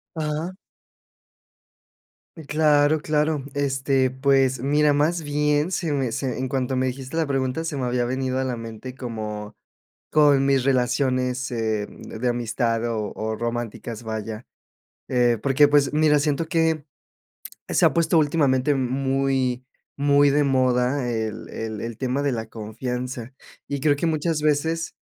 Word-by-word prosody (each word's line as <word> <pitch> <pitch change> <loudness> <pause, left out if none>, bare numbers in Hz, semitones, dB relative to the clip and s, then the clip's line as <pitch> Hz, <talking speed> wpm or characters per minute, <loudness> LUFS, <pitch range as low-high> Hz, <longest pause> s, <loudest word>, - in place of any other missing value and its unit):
Ajá. 160 +3 -3 1.8
Eh, 160 - -10
claro, 150 0 +3
claro. 150 -1 0
Este, 135 -2 +1
pues, 130 -1 +2
mira, 145 +3 +3
más 155 +3 +1
bien, 150 +3 +1
se 165 -5 -1
me 135 -4 -1
se 125 -1 -2
en 130 0 -2
cuanto 130 -1 -1
me 130 0 +1
dijiste 130 +3 -5
la 165 -1 +1
pregunta, 135 +2 -1
se 155 -3 -3
me 130 - -1
había 125 0 0
venido 130 +1 -1
a - - 0
la 125 -2 -2
mente 115 +2 -8
como, 110 -5 -6 0.6
con 145 -3 +5
mis 135 -2 +2
relaciones, 130 0 +1
eh, 110 -3 -1
de 120 +3 -5
amistad 115 -1 -1
o 110 -2 -3
o 110 0 -3
románticas, 120 -1 -4
vaya, 110 +1 -5 0.6
eh, 120 -2 +2
porque, 140 +4 +4
pues, 145 -1 +3
mira, 150 -1 +4
siento 150 +2 0
que 160 -2 +1 0.8
se - - +3
ha - - +4
puesto 165 -1 +3
últimamente 145 -2 +2
muy 130 -1 0 0.3
muy 145 0 +4
de 145 +1 +3
moda 130 -1 +1
el 110 -1 -4
el 110 -2 -5
el 115 -1 -5
tema 130 +1 -1
de 145 -1 +1
la 115 -2 -3
confianza, 125 +3 -5 0.3
y 140 - -3
creo 145 +1 +3
que 145 - -2
muchas 155 -1 0
veces 160 +2 0
135 Hz, 150 wpm, -23 LUFS, 120-145 Hz, 1.8 s, con